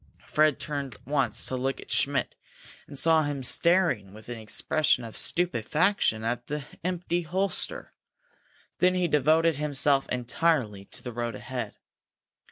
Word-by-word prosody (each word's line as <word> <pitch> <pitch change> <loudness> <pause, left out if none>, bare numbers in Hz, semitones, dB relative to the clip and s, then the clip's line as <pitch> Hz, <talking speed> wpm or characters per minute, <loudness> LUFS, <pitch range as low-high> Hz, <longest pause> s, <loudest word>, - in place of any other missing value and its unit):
Fred 155 -2 +2
turned 140 -6 -4
once 140 0 0
to 130 - -2
look 130 +1 -2
at - - -11
Schmidt, - - +2 0.5
and 140 - -6
saw 160 +2 +5
him 145 -3 -3
staring 150 - +2
with 110 +2 -13
an 120 -1 -5
expression 125 +4 +1
of 115 -2 -8
stupefaction 170 - +1
at 120 +1 -2
the 150 -2 -4 0.2
empty 175 -1 -1
holster. 190 - -1 0.9
Then 180 0 +4
he 180 -1 +1
devoted 155 +1 +3
himself 145 -2 +2
entirely 125 -5 0
to - - -7
the 125 - -5
road 120 -1 -3
ahead. 125 -5 -5
145 Hz, 140 wpm, -27 LUFS, 120-165 Hz, 0.9 s, saw